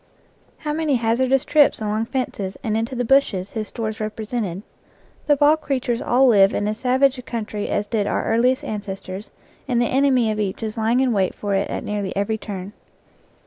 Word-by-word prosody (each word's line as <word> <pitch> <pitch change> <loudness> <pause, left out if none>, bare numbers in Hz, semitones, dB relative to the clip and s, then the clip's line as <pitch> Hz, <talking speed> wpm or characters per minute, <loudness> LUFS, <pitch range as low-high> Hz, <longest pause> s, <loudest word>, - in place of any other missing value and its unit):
How 300 -2 -3
many 310 -3 +1
hazardous 250 +3 +1
trips 295 -1 +4
along 215 +1 -1
fences 235 -7 -3
and 215 -1 -1
into 230 +3 -2
the 245 0 -1
bushes 225 -8 +2
his 215 -2 -4
stores 220 0 -4
repre 215 0 -4
sented! 205 -6 -3 0.6
The 290 -1 +4
wild 305 +2 +4
creatures 255 -5 -1
all 255 +3 +3
live 200 -5 +5
in 205 - 0
as 215 +1 -3
savage 260 +1 +2
a - - -6
country 220 -4 -4
as 205 - 0
did 210 -1 -1
our - - -1
earliest 250 +3 +2
ancestors, 195 -1 -6 0.4
and 245 -3 +1
the 240 - +3
enemy 255 -3 +2
of 215 - -3
each 205 +1 -2
is 215 -1 -3
lying 230 +3 +2
in 255 -3 +2
wait 190 -3 0
for 205 -1 -3
it 195 +1 0
at - - -3
nearly 205 -2 -3
every 200 +3 -1
turn. 200 -1 -7
225 Hz, 195 wpm, -22 LUFS, 210-255 Hz, 0.6 s, live